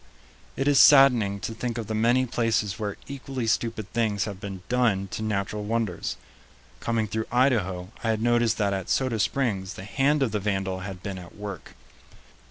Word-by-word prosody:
It 135 - -1
is 145 -2 +5
saddening 125 -8 +6
to 115 - -4
think 120 +1 -4
of 115 - -3
the 110 - -4
many 120 +4 +3
places 115 -4 0
where 105 -2 -3
equally 135 -2 -5
stupid 110 -2 -1
things 105 -3 +1
have 100 -3 -6
been 95 -3 -7
done 115 -6 +1
to - - -5
natural 105 -1 -2
wonders. 110 -4 -2 0.6
Coming 115 -2 -1
through 110 +1 -3
Idaho, 105 -8 +1
I 115 - 0
had 110 -1 +1
noticed 120 -1 +2
that 100 -2 +1
at 95 -2 -4
Soda 130 -4 +1
Springs 105 -5 -1
the 95 - -8
hand 140 +6 +2
of 120 - 0
the 105 - -1
vandal 95 -2 -1
had 95 -1 -7
been 95 -2 -5
at 90 -1 -12
work. 100 -5 -8
110 Hz, 180 wpm, -26 LUFS, 100-120 Hz, 0.6 s, saddening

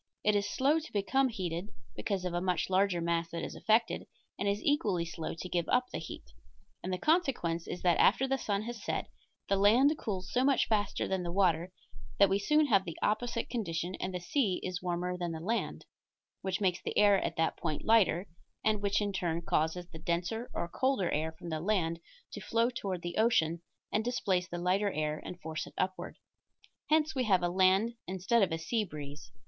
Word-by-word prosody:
It 210 0 +3
is 205 0 +1
slow 285 +8 +2
to 320 - -10
become 260 +7 +2
heated, 180 -3 -4 0.3
because 185 - -2
of 180 - -2
a 175 - 0
much 180 -1 0
larger 185 -2 +2
mass 170 0 0
that 170 - -4
is - - -5
affected, 225 +1 +1 0.3
and 200 - 0
is 200 +1 0
equally 205 -12 +1
slow 165 -1 -5
to 175 - -6
give 175 -2 -1
up 250 0 +2
the - - -3
heat. - - -8 0.6
And 185 - -3
the 185 - 0
consequence 245 - +1
is 180 - -5
that 175 -2 +3
after 265 +6 +4
the 270 0 0
sun 205 -2 -1
has 230 -2 -6
set, - - -3 0.4
the 195 - +2
land 240 +10 +5
cools 190 -4 -4
so 250 - +3
much 275 -1 +3
faster 205 -3 0
than 190 -1 -1
the 175 -1 -3
water 175 -2 +2 0.5
that 200 -1 +6
we 195 +1 +2
soon 300 +9 +3
have 200 -8 +4
the 170 -4 -7
opposite 230 +2 0
condition, 175 -6 -3
and 185 - -2
the 180 - -3
sea 190 +2 0
is 180 -1 -3
warmer 180 0 -2
than 175 -2 -2
the 160 - -5
land, 220 +8 -2 0.6
which 190 -1 -2
makes 185 -3 +1
the - - -4
air 205 -2 +5
at - - -2
that 165 -1 +1
point 155 -3 -3
lighter, 205 -5 +4 0.4
and 215 -1 +2
which 200 +1 +1
in 205 -1 -1
turn 170 -3 -1
causes 165 +3 0
the 160 - -10
denser 175 +8 -2
or - - -3
colder 260 -1 0
air 155 +2 0
from 165 +1 -9
the 160 -1 -2
land 170 -3 0 0.3
to - - -7
flow 230 +2 +1
toward 190 -7 -4
the 175 0 -4
ocean, 170 -8 +2 0.3
and 215 - +1
displace 190 -7 0
the 175 - -5
lighter 190 +4 +1
air 155 -1 -2
and 180 - -7
force 160 0 -4
it - - -14
upward; 185 0 -2 0.7
hence 310 0 +3
we 260 - 0
have 190 -4 +3
a 175 - +2
land 190 +5 +3
instead 190 +5 +1
of 190 -4 +2
a 165 - 0
sea 215 +8 -1
breeze. 145 -5 -8
190 Hz, 210 wpm, -31 LUFS, 170-220 Hz, 0.7 s, that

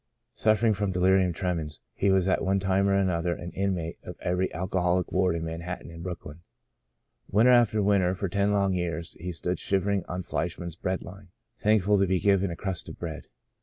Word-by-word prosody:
Suffering 110 +1 +3
from 100 -1 -1
delirium 95 0 +3
tremens 85 -4 -3
he 100 - +1
was 95 -1 +3
at 95 - +1
one 95 +1 +2
time 95 +1 +2
or 100 - +3
another 90 -3 +1
an 85 0 -7
inmate 95 -4 -2
of - - -8
every 90 +1 0
alcoholic 90 +1 0
ward 90 -2 +2
in 85 0 -3
Manhattan 85 +2 -6
and 85 0 -10
Brooklyn. 85 -3 -7 0.9
Winter 115 +5 +5
after 115 -4 +4
winter 95 -2 +3
for 100 +1 -2
ten 100 +3 +1
long 100 -2 +2
years 85 -2 -3
he 90 +2 -4
stood 90 +2 -3
shivering 100 0 0
on 90 +1 -4
Fleischman's 85 -1 -3
bread 95 +2 -2
line, 95 +1 -11 0.3
thankful 105 -2 +3
to 95 - +3
be 95 0 +1
given 100 -1 +3
a 85 - -4
crust 95 -1 -4
of - - -9
bread. 80 -3 -6
95 Hz, 190 wpm, -27 LUFS, 85-100 Hz, 0.9 s, Winter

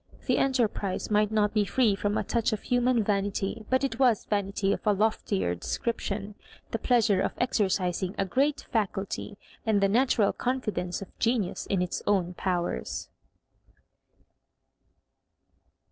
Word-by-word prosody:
T - - +2
he - - +2
enterprise 225 -8 0
might 210 0 +3
not 210 -1 +2
be 210 -1 +3
free 220 +1 +2
from 205 +1 -1
a - - 0
touch 235 0 0
of 215 - -4
human 245 -2 +2
vanity, 200 +1 -1
but 260 +1 +2
it 260 -3 -2
was 245 -5 +3
vanity 200 -1 0
of - - -4
a 210 - +5
loftier 190 - 0
de 85 - -10
scription: 210 -3 -2 0.4
the 225 - -1
pleasure 225 -6 +3
of - - -1
exercising 190 -5 0
a 195 - +1
great 280 +9 0
faccUty, 200 -1 -2 0.3
and 220 -2 +2
the 200 - +4
natural 225 -1 +3
confidence 215 -8 -2
of - - -17
genius 225 -5 0
in 190 -2 +1
its 180 - -3
own 185 -3 +2
powers. 175 - -2
210 Hz, 145 wpm, -28 LUFS, 195-235 Hz, 0.4 s, a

